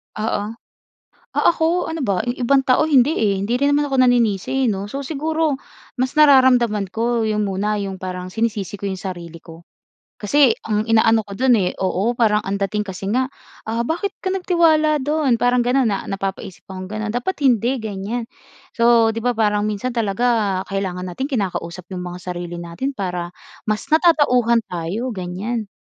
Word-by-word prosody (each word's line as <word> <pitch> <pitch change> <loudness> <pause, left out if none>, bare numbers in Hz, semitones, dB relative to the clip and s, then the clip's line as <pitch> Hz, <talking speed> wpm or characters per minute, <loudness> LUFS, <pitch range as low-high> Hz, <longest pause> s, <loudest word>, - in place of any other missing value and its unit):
Oo. 215 0 -2 0.8
Ah - - -1
ako, 330 +2 +1
ano 320 -3 -3
ba? 195 -5 0
'Yong 245 - -1
ibang 275 +3 +4
tao 255 +4 +4
hindi, 290 0 +4
eh. 205 -2 +2
Hindi 220 +5 -1
rin 280 +2 +2
naman 290 0 +2
ako 265 -2 +3
naninisi, 245 +1 +2
'no? 200 -1 -2
So, 275 - -4
siguro 310 +1 -1 0.4
mas 255 0 -1
nararamdaman 250 -8 +5
ko 230 0 0
'yong 210 -1 0
muna 205 +2 -1
'yong 195 -1 -4
parang 185 -1 -6
sinisisi 210 -1 -2
ko 200 - -14
'yong 190 -2 -3
sarili 170 -3 -7
ko. 165 0 -14 0.6
Kasi 270 +5 +4 0.2
ang 210 -1 +1
inaano 225 0 +3
ko 200 - -11
do'n, 255 +4 +3
eh 180 -3 +1
oo, 190 +4 0
parang 215 -3 +2
ang 200 +1 -3
dating 210 +1 -1
kasi 190 0 -7
nga, 255 +5 0 0.3
ah, 225 +1 -2
"Bakit 380 +5 -3
ka - - -2
nagtiwala 320 -5 +3
do'n?" 285 -4 +1
Parang 245 0 +2
gano'n, 250 +1 +2
na 200 - -2
napapaisip 195 -1 -5
akong 185 0 -7
gano'n. 215 +1 -4
"Dapat 250 +10 -2
hindi," 245 +2 +2
ganyan. 220 +3 -4 0.5
So, 235 -1 +5
'di 230 - -4
ba, 245 - +2
parang 210 -2 +1
minsan 215 +4 -2
talaga 215 -2 +1
kailangan 185 -2 -3
nating 265 +11 -4
kinakausap 180 -5 -3
'yong 185 -2 -5
mga 180 0 -7
sarili 175 -1 -5
natin 170 +12 -4
para 180 -6 -4 0.3
mas 215 -1 -2
natatauhan 290 -8 +4
tayo, 190 +8 -3
ganyan. 200 +4 -4
220 Hz, 170 wpm, -20 LUFS, 195-255 Hz, 0.8 s, nararamdaman